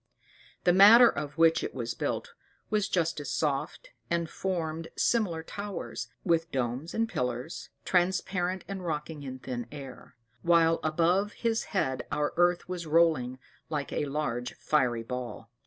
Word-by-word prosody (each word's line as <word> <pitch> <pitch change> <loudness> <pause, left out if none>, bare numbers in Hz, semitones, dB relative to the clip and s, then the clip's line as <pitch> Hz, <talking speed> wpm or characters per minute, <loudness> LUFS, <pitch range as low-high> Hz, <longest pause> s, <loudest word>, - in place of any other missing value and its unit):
The 175 - +5
matter 215 +6 +9
of 150 -7 -3
which 165 0 +4
it - - -4
was 120 -2 -3
built - - -3 0.4
was 210 -2 +1
just 165 -3 0
as 145 - -5
soft, 145 0 -2 0.2
and 170 -1 0
formed 165 -3 -3
similar 185 -9 +1
towers, 200 +3 -5 0.2
and 165 -2 +1
domes, 130 +4 -2
and 225 0 +1
pillars, 125 - -3 0.2
transparent 185 0 0
and 195 -2 -5
rocking 155 -2 -4
in 135 -2 -6
the 130 - -14
thin 120 -2 -4
air; 140 -3 -10 0.3
while 165 -1 +4
above 175 +6 +2
his 230 -1 -1
head 130 - -1
our 145 0 0
earth 175 0 +2
was 180 -2 -5
rolling 150 -6 +3 0.3
like 150 -3 -3
a - - 0
large 135 -4 -2
fiery 125 -6 +1
ball. 120 -2 -6
165 Hz, 150 wpm, -29 LUFS, 135-180 Hz, 0.4 s, matter